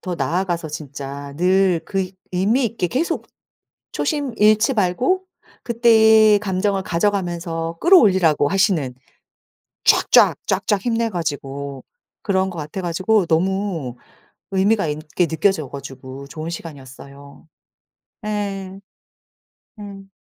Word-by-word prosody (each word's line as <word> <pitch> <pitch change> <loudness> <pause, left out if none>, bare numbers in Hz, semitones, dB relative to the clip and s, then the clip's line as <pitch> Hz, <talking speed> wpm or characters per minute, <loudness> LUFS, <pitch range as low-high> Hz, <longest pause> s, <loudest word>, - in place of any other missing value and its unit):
더 180 - -4
나아가서 170 +2 -2
진짜 140 -1 -7
늘 185 -1 +2
그 190 -2 -2 0.2
의미 210 +9 +1
있게 225 -5 -1
계속 280 - -2 0.7
초심 285 -6 -2
잃지 215 +5 +4
말고 235 - +1 0.4
그때의 220 -2 +5
감정을 195 0 -1
가져가면서 170 -3 -2
끌어올리라고 190 - +5
하시는 180 - +1 0.9
쫙쫙 - - +5
쫙쫙 195 +1 0
힘내 230 -1 0
가지고 140 -5 -5 0.4
그런 190 -2 0
것 175 - -9
같아 155 +5 -5
가지고 185 +4 +1
너무 170 -6 -1 0.6
의미가 195 0 +2
있게 155 +4 -2
느껴져 160 -2 0
가지고 135 0 -9
좋은 155 +2 -6
시간이었어요. 140 -2 -11 0.8
예. 195 -2 -4 1.0
음. 195 -1 -10
185 Hz, 240 characters per minute, -20 LUFS, 155-205 Hz, 1.0 s, 그때의